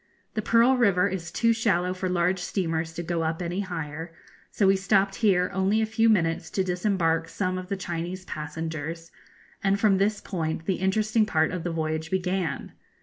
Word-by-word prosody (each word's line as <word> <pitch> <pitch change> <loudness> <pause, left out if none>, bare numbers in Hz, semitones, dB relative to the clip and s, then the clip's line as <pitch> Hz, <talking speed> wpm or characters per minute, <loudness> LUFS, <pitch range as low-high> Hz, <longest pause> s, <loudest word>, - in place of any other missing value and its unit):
The 215 - -1
Pearl 235 +4 +4
River 200 -5 +3
is 180 -3 -4
too 230 +5 +3
shallow 185 -6 +1
for 185 0 -3
large 180 +1 +1
steamers 165 -3 -2
to 170 - -5
go 170 0 -1
up 160 0 -1
any 175 +1 -3
higher; 165 -4 -5 0.4
so 205 - +1
we 195 0 +5
stopped 195 0 +2
here 190 -5 +2
only 195 +3 +2
a 220 - +2
few 225 +1 +2
minutes 165 -5 +1
to 190 - +3
disembark 180 -3 0
some 185 -2 -2
of 185 0 -9
the 200 - -1
Chinese 180 +1 -4
passengers, 160 +1 -5 0.5
and 195 0 +2
from 200 -3 +3
this 205 +1 +1
point 160 -3 -3
the 190 - 0
interesting 215 +3 +2
part 160 -5 +2
of 180 -2 -4
the 175 - -2
voyage 160 0 -2
began. 185 -2 -2
185 Hz, 185 wpm, -26 LUFS, 165-200 Hz, 0.5 s, we